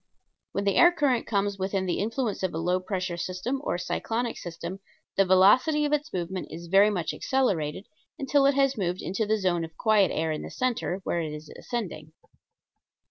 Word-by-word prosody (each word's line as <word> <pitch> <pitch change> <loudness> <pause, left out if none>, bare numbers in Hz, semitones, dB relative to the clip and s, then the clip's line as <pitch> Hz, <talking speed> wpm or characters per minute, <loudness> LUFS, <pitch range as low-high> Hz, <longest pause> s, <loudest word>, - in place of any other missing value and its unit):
When 200 - -1
the 200 -1 +1
air 345 - +8
current 285 -8 +1
comes 200 -2 0
within 190 0 -1
the 180 - -1
influence 225 +1 -2
of 185 -4 -2
a - - -2
low 180 +3 +1
pressure 185 -2 -3 0.5
or - - -1
cyclonic 230 +6 -2
system 170 +2 -7 0.4
the 195 - +4
velocity 210 - +5
of 295 - 0
its 300 +1 -1
movement 180 +1 -4
is 170 +1 -8
very 195 +4 +5
much 180 -6 -2
accelerated 195 - -1 0.3
until 275 0 +3
it 280 - +3
has 275 -1 +3
moved 180 -3 -2
into 205 +4 -2
the 220 +1 +2
zone 180 -4 0
of 160 0 -9
quiet 215 -3 +4
air 160 0 -1
in 155 - -3
the - - -7
center, 245 -7 -2
where 170 - -1
it 155 -2 -4
is 150 0 -9
ascending. 170 -10 -5
195 Hz, 190 wpm, -27 LUFS, 175-240 Hz, 0.5 s, air